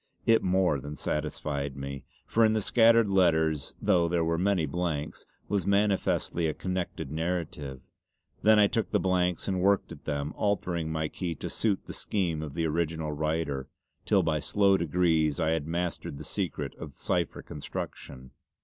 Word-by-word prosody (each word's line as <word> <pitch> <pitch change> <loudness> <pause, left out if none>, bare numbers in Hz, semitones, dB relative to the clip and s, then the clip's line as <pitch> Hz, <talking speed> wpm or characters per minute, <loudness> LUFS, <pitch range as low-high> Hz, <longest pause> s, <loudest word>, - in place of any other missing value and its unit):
It 115 0 +5
more 90 -5 +2
than 75 +3 -7
satisfied 70 -1 -3
me, 70 0 -6 0.2
for 115 - +2
in 110 -1 +5
the 110 - +1
scattered 115 0 +5
letters 80 -6 +2
though 85 -2 +3
there 85 -1 +1
were 85 0 0
many 95 -3 +2
blanks, 75 -1 -3 0.2
was 100 -1 -1
manifestly 100 -4 +1
a 80 - -2
connected 90 -6 -3
narrative. 80 -5 -3 0.6
Then 110 0 +6
I 105 - +7
took 110 +1 0
the - - +2
blanks 90 -1 +1
and 95 -2 0
worked 100 0 +2
at 80 - -11
them 75 0 -2
altering 90 -6 -1
my 80 -1 -1
key 85 +1 -4
to - - -5
suit 105 -4 0
the - - -7
scheme 85 -7 -1
of 75 -2 -6
the 85 -1 0
original 80 -1 -1
writer, 75 -3 -2 0.4
till - - +4
by 80 -2 +1
slow 100 +5 +3
degrees 80 -3 +2
I 80 - +2
had 80 -2 -1
mastered 85 -4 -3
the 75 - -7
secret 75 -3 -3
of 75 -4 -7
the - - -20
cipher - - -1
construction. 65 -3 -7
85 Hz, 170 wpm, -28 LUFS, 75-95 Hz, 0.6 s, I